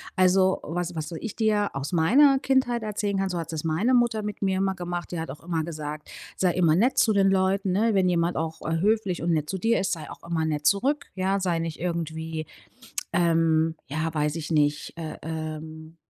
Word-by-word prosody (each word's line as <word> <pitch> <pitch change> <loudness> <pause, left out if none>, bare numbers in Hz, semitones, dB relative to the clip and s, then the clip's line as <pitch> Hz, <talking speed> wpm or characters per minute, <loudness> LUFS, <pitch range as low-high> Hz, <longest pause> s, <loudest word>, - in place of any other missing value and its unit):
also, 185 0 +4
was 175 +2 -3
was 155 -1 -3
so 170 - -7
ich 220 - -6
dir 210 -2 +2
aus 135 +1 -4
meiner 265 - +5
Kindheit 260 -4 +1
erzählen 205 -1 -2
kann, 195 0 0
so 180 - -3
hat 165 - -4
s 160 - -5
das - - -22
meine 165 +11 +1
Mutter 235 -3 +3
mit 210 -1 -5
mir 190 -1 +1
immer 190 0 0
gemacht. 175 -1 -5
Die 175 - -3
hat 160 - -4
auch 150 - -11
immer 165 -2 -1
gesagt,: 150 -2 -6 0.3
„Sei 180 -2 +1
immer 165 -3 +3
nett 235 +9 +2
zu 220 - +4
den 195 -1 +4
Leuten,“ 190 +1 +1
ne? 215 +4 +2
„Wenn 190 -2 +3
jemand 170 0 +1
auch, 160 0 -3
äh, 165 0 -1
höflich 200 -1 +1
und 170 0 0
nett 155 -2 0
zu 190 - -2
dir 225 +5 +2
ist, 190 -1 0
sei 155 -3 -6
auch - - -12
immer 160 -2 0
nett 150 -1 -2
zurück,“ 260 - +2
ja, 190 +1 0
„Sei 175 -3 0
nicht 165 -1 -4
irgendwie, 160 -2 -3 0.7
ähm, 165 -2 +2
ja, 155 +3 -2
weiß 150 +1 0
ich 155 0 -5
nicht, 150 -2 +1
äh, 160 -2 -6
ähm, 160 0 -6
175 Hz, 220 wpm, -26 LUFS, 160-195 Hz, 0.7 s, meiner